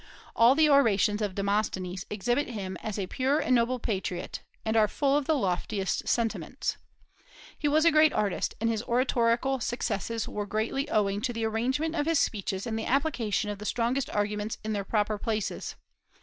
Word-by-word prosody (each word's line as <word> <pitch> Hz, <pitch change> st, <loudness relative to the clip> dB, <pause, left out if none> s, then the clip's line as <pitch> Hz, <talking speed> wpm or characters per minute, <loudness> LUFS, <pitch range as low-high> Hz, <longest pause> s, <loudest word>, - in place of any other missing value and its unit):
All 235 Hz, +3 st, +6 dB
the 310 Hz, +1 st, +5 dB
orations 220 Hz, -7 st, +4 dB
of 200 Hz, -3 st, -2 dB
Demosthenes 195 Hz, -2 st, -1 dB
exhibit 240 Hz, +7 st, 0 dB
him 195 Hz, -6 st, -5 dB
as 215 Hz, -2 st, -4 dB
a 195 Hz, -, -1 dB
pure 265 Hz, +8 st, 0 dB
and 255 Hz, -, +1 dB
noble 245 Hz, +1 st, +2 dB
patriot, 190 Hz, -6 st, -3 dB, 0.2 s
and 220 Hz, 0 st, 0 dB
are 215 Hz, -1 st, +5 dB
full 275 Hz, +5 st, +1 dB
of 290 Hz, -1 st, +1 dB
the 315 Hz, -, +2 dB
loftiest 195 Hz, -3 st, -1 dB
sentiments. 230 Hz, -2 st, -1 dB, 0.8 s
He 295 Hz, -, -1 dB
was 310 Hz, +2 st, +3 dB
a 335 Hz, -, +7 dB
great 310 Hz, 0 st, +5 dB
artist, 205 Hz, -3 st, -1 dB
and 230 Hz, -, 0 dB
his 225 Hz, -2 st, 0 dB
oratorical 240 Hz, +1 st, +1 dB
successes 230 Hz, -2 st, -2 dB
were 205 Hz, -1 st, -4 dB
greatly 230 Hz, +8 st, -1 dB
owing 205 Hz, -3 st, +1 dB
to 245 Hz, -, -1 dB
the 230 Hz, -1 st, -2 dB
arrangement 260 Hz, +9 st, 0 dB
of 295 Hz, -2 st, -1 dB
his 330 Hz, -1 st, +3 dB
speeches 200 Hz, -6 st, -1 dB
and 225 Hz, -2 st, -2 dB
the 220 Hz, -, -4 dB
application 240 Hz, -7 st, 0 dB
of 205 Hz, -, -7 dB
the -, -, -7 dB
strongest 245 Hz, +3 st, 0 dB
arguments 210 Hz, +1 st, -2 dB
in 215 Hz, 0 st, -2 dB
their 200 Hz, -1 st, -1 dB
proper 210 Hz, +1 st, 0 dB
places. 215 Hz, -2 st, -3 dB
225 Hz, 180 wpm, -28 LUFS, 205-260 Hz, 0.8 s, a